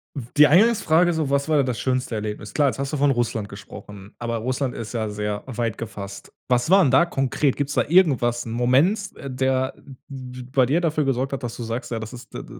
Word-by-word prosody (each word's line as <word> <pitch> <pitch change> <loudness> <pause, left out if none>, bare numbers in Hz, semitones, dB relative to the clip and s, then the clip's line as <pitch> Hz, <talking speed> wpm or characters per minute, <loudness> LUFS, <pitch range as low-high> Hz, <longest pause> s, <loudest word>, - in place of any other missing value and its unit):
w 135 -5 -5
die 150 - +8
Eingangsfrage 175 - +4
so: 155 -4 -1
„Was 140 +2 0
war 150 -3 +3
das 125 -3 -3
schönste 130 -2 -1
Erlebnis?“ 105 -1 -5
Klar, 145 -2 +3
jetzt 135 - -6
hast 140 +2 -3
du - - 0
von 140 0 +3
Russland 115 -4 -1
gesprochen, 100 0 -11
aber 115 -1 -2
Russland 130 +2 -2
ist 115 +1 -6
ja 110 -2 -2
sehr 105 0 -3
weit 115 -4 -3
gefasst. 100 -3 -8 0.2
Was 125 +3 +2
war 195 +1 +6
denn 135 - +2
da 170 +6 +5
konkret? 135 -2 0
Gibt's 145 0 -2
da - - +2
irgendwas 135 -9 +3
'n 115 - -6
Moment, 140 - +2 0.2
der 130 0 0 0.3
b 130 -2 -8
bei 130 -1 +4
dir 165 +6 +2
dafür 155 -3 0
gesorgt 135 +1 -1
hat, 135 - -4
dass 120 - -4
du 120 - -5
sagst: 115 +2 -4
„Ja, 115 - -2
das 110 +2 -7
ist 125 - -12
d - - -6
d - - -12
130 Hz, 230 wpm, -23 LUFS, 115-145 Hz, 0.3 s, die